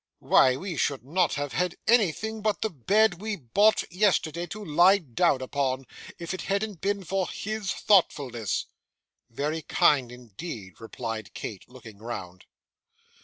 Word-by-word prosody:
Why, 130 -1 +4
we 175 +3 -5
should 135 -3 -1
not 175 +5 +1
have 145 -1 -3
had 180 0 0
anything 220 0 +2
but 210 -1 0
the 220 - -1
bed 190 - +2
we 220 0 -2
bought 200 - +3
yesterday, 175 -3 +1
to 210 +4 -7
lie 175 +6 +5
down 130 - +1
upon, 130 -1 -1 0.3
if 170 +2 -5
it 185 - -4
hadn't 200 -2 -2
been 200 0 -1
for 190 +1 -1
his 215 -2 -3
thoughtfulness!' 130 - +1 0.6
'Very 150 +7 -2
kind, 135 -4 +2
indeed,' 115 - -9
replied 115 -1 -6
Kate, 100 0 -7
looking 115 -5 -13
round. 95 -6 -7
160 Hz, 140 wpm, -27 LUFS, 125-200 Hz, 0.6 s, lie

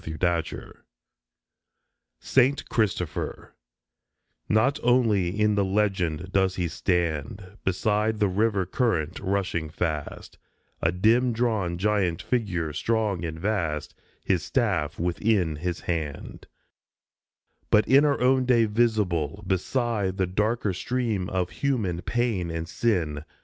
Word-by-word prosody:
SAINT 80 0 -6
CHRISTOPHER 90 +1 +2 0.3
97 - - -15 1.4
SAINT 130 +2 +2
CHRISTOPHER 95 -7 -2 0.9
NOT 120 +7 +2
only 105 -7 +2
in 105 0 +3
the 100 -1 +2
legend 95 -4 0
does 95 -1 +2
he 90 -2 -1
stand 90 +2 -2
Beside 105 +3 0
the 105 - +3
river 100 0 +1
current 90 - -1
rushing 95 -5 -1
fast, 75 -3 -4 0.4
A 85 - +2
dim 115 +7 +3
drawn 110 -7 0
giant 95 -3 +1
figure, 90 - -1
strong 105 0 0
and 80 -1 -4
vast, 85 -7 -2 0.3
His 90 -4 +2
staff 95 - 0
within 90 -1 +1
his 90 +2 -3
hand; 80 -4 -4 1.2
But 105 0 +4
in 140 +2 +6
our 145 -2 +2
own 130 0 +3
day 120 -2 +4
visible, 105 -5 0
beside 100 +1 -1
The 95 - +2
darker 105 +3 0
stream 115 -3 -2
of 90 -1 -1
human 110 -12 -1
pain 115 -8 -1
and 80 0 -4
sin 85 -8 -1
95 Hz, 120 wpm, -26 LUFS, 85-110 Hz, 1.4 s, in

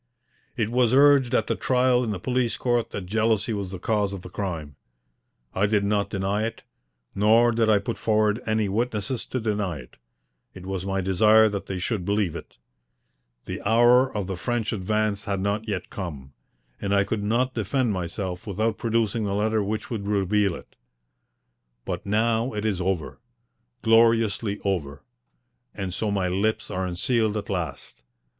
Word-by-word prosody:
It 110 -2 0
was 125 0 +3
urged 140 -3 +5
at - - +2
the - - -1
trial 125 -1 +2
in 115 - -2
the 105 - -2
police 125 +1 0
court 120 -2 0
that 100 - -6
jealousy 110 +2 +1
was 100 -3 -3
the 95 - -6
cause 100 +1 0
of 95 -2 -7
the 90 - -10
crime. 80 -8 -4 0.8
I 100 +2 +2
did 105 -1 +1
not 100 0 0
deny 100 +1 -1
it, 115 - -4 0.5
nor 115 +4 +4
did 115 -1 +1
I 105 - +5
put 100 +4 -4
forward 110 +1 +1
any 110 -1 +1
witnesses 115 +3 -2
to 130 - -2
deny 105 -6 -1
it. 65 -3 -13 0.6
It 90 -1 -10
was 95 0 -4
my 95 0 0
desire 110 +4 +5
that 100 -1 -5
they 95 - -3
should 95 +1 -2
believe 100 -3 0
it. - - -10 0.9
The - - -5
hour 120 +4 +4
of 100 - -2
the 95 -1 -4
French 120 +3 -2
advance 105 +1 -1
had 100 -2 -1
not 100 +3 -1
yet 95 -4 -4
come, 70 -8 -7 0.5
and 100 0 0
I 100 - +4
could 105 +1 -2
not 120 +5 0
defend 115 +2 0
myself 90 +1 -4
without 110 +3 -1
producing 115 -1 0
the 100 -1 -1
letter 110 +1 +1
which 105 +3 -4
would 105 -4 -3
reveal 100 -2 +1
it. - - -13 1.1
But - - -4
now 115 +3 +1
it 105 0 -3
is 100 -4 0
over 90 -4 -2 0.6
gloriously 115 -2 +3
over 75 -8 -2 0.7
and 95 -3 -4
so 110 +3 -1
my 100 -2 0
lips 110 +4 -1
are 95 0 -2
unsealed 110 +4 0
at 105 - -5
last. 85 -8 -5
105 Hz, 170 wpm, -25 LUFS, 95-115 Hz, 1.1 s, urged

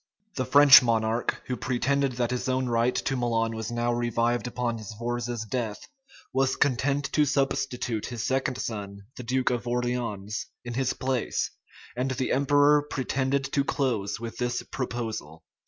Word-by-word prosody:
The 130 - -2
French 140 +1 +9
monarch, 115 -1 0
who 125 - -2
pretended 135 +2 0
that 120 0 -1
his 125 +1 -2
own 130 0 +1
right 120 +1 +1
to 135 - -1
Milan 115 -2 0
was 110 0 -4
now 120 0 0
revived 120 0 0
upon 120 -1 -2
Sforza's 120 +2 -4
death, 110 -2 -4 0.5
was 135 0 +2
content 140 +1 +1
to 150 - +3
substitute 135 -5 -1
his 120 -2 -4
second 130 -1 0
son, 100 -4 -5
the - - -7
duke 125 +1 0
of 120 -1 -2
Orleans, 120 -4 -2 0.2
in 120 - -4
his 130 +1 0
place; 130 -2 -1 0.4
and 125 +2 -1
the 130 0 -1
emperor 145 +2 +4
pretended 135 -1 -1
to 140 - +3
close 115 -9 -1
with 115 0 -6
this 125 0 -1
proposal. 110 - -4
125 Hz, 155 wpm, -27 LUFS, 115-130 Hz, 0.5 s, French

